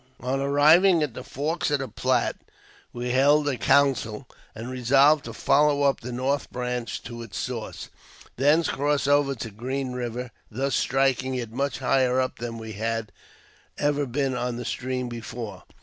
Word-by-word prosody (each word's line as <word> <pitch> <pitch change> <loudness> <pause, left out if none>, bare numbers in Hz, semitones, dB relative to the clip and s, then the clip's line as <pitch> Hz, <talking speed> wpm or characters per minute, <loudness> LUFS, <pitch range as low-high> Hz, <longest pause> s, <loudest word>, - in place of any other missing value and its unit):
On 130 +2 -1
arriving 155 +5 +5
at 145 -6 -3
the 125 - -7
forks 155 +7 -2
of 145 - +2
the 135 0 -4
Platte, 130 0 0 0.5
we 120 0 -4
held 145 +3 +4
a 140 - +1
council, 130 -2 +2 0.3
and 115 +2 -7
resolved 135 +4 +4
to - - -6
follow 145 0 +3
up 140 -1 +2
the 125 +1 -7
north 130 +3 -1
branch 125 -1 -3
to 120 0 -8
its 110 -4 -8
source, - - -5 0.5
thence 150 +6 +3
cross 145 0 0
over 145 -1 +3
to 115 -2 -6
Green 130 +5 -3
Eiver, 125 0 -4 0.2
thus 135 +4 -2
striking 130 -1 +1
it 120 -3 -4
much 140 +4 -2
higher 130 -1 +2
up 130 0 -2
than 115 -1 -5
we 110 -1 -7
had 115 0 -3 0.7
ever 145 -1 0
been 135 +1 -1
on 125 -1 -2
that 120 - -5
stream 125 0 -3
before. 115 -4 -7
130 Hz, 165 wpm, -25 LUFS, 120-140 Hz, 0.7 s, arriving